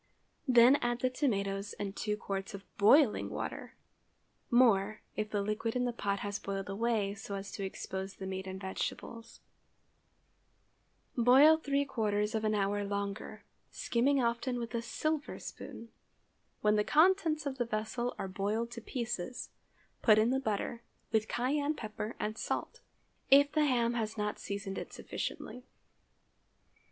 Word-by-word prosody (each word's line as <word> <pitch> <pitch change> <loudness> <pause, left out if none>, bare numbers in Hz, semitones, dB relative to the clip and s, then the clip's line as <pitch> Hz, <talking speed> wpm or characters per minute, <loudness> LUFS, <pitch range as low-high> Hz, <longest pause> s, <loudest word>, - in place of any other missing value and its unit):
Then 250 +2 +7
add 240 -1 -1
the 255 - +2
tomatoes 200 -7 -1
and 200 -1 -5
two 210 -1 -2
quarts 195 0 -4
of 195 0 -10
boiling 235 +4 +5
water—more, 215 -4 -1
if 215 0 -2
the 205 -1 -1
liquid 215 +3 -2
in 250 0 +1
the 245 - -1
pot 200 -3 -2
has 205 0 -3
boiled 195 0 -4
away 210 -1 0
so 200 0 -6
as 195 0 -6
to 200 - -5
expose 190 0 -5
the 190 - -7
meat 190 0 -4
and 190 0 -5
vegetables. 225 +4 -5 1.7
Boil 260 +6 +7
three 285 -3 0
quarters 210 -5 0
of 220 -1 -1
an 215 0 +1
hour 205 0 0
longer, 200 0 -4 0.3
skimming 270 +4 +1
often 240 +2 0
with 235 0 -5
a 235 - 0
silver 310 +5 -2
spoon. 230 - -9 0.7
When 210 0 +3
the 210 - +3
contents 315 - +3
of 270 -2 -4
the 240 - +1
vessel 225 +2 -2
are - - -3
boiled 210 +5 -2
to 235 -1 -7
pieces, 240 -1 -4 0.5
put 215 -2 +6
in 220 +3 +4
the 265 - +2
butter, 230 -1 -2 0.3
with 220 -1 +2
cayenne 285 +5 0
pepper 215 -1 -5
and 215 +1 -3
salt, - - -3 0.5
if 285 +1 +7
the 305 -1 +3
ham 240 -4 +2
has 225 -2 -2
not 210 0 -2
seasoned 200 -1 -4
it - - -7
sufficiently. 250 +1 -6
220 Hz, 150 wpm, -32 LUFS, 200-250 Hz, 1.7 s, Then